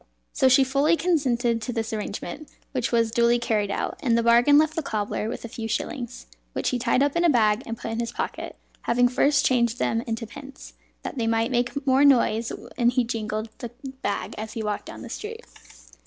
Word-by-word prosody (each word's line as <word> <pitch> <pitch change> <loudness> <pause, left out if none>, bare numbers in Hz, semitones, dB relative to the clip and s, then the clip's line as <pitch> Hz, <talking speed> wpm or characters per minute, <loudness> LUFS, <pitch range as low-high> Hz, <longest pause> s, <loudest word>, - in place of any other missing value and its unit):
So 265 - +4
she 265 +1 +6
fully 280 +5 +2
consented 250 -9 +1
to 245 - -3
this 225 -1 -3
arrangement, 210 - -5 0.2
which 255 -4 -1
was 230 -2 +2
duly 235 0 +3
carried 215 -4 0
out; 360 - -3
and 235 -6 +2
the 235 - +1
bargain 240 +5 +6
left 310 +1 +3
the 325 - 0
cobbler 215 -4 -2
with 235 - -6
a - - -4
few 225 -1 -6
shillings, 240 +2 -4 0.3
which - - -1
he 250 - -1
tied 250 +3 +2
up 285 +1 0
in 340 - +2
a 345 - +5
bag 220 -4 +3
and 230 0 -4
put 225 - -5
in 225 - -3
his 235 0 -2
pocket, - - -4 0.3
having 245 +1 +3
first 280 +3 +2
changed 240 -2 +2
them 225 -2 0
into 230 0 -3
pence, 275 +3 -11 0.3
that 270 - -5
they 225 - 0
might 225 +2 +1
make 250 +3 -1
more 265 +1 +4
noise 235 -5 +4 0.3
when 240 -1 +4
he 250 0 +2
jingled 220 -1 -3
the 240 - -5 0.3
bag 200 +1 -2
as 220 0 -6
he 225 - -4
walked 210 -1 -3
down - - -9
the - - -8
street. 455 +2 -7
240 Hz, 215 wpm, -25 LUFS, 225-275 Hz, 0.3 s, she